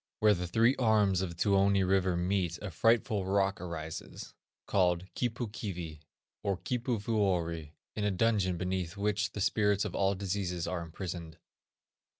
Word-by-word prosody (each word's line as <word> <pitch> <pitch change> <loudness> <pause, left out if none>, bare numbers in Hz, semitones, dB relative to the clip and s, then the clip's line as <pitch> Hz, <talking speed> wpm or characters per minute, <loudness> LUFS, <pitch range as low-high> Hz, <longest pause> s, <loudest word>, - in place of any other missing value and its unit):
Where 105 -1 +5
the 90 -2 -3
three 115 +8 +3
arms 105 -6 +3
of 95 - -1
the 85 - -8
Tuoni 100 +1 +3
river 95 -2 +2
meet 90 -1 0
a 105 - -6
frightful 110 +2 +2
rock 95 0 +1
arises, 80 -3 -6 0.3
called 90 -2 +2
Kipu 120 -1 -2
Kivi, 85 -8 -5 0.4
or 100 -2 -1
Kipuvuori, 100 - -1 0.2
in 105 - -2
a 105 - +2
dungeon 95 -2 +1
beneath 90 0 -2
which 105 +1 0
the 105 - -4
spirits 105 0 +2
of 100 - -4
all 100 0 +2
diseases 95 -3 -2
are 90 -2 -2
imprisoned. 85 -1 -6
95 Hz, 150 wpm, -31 LUFS, 90-105 Hz, 0.4 s, Where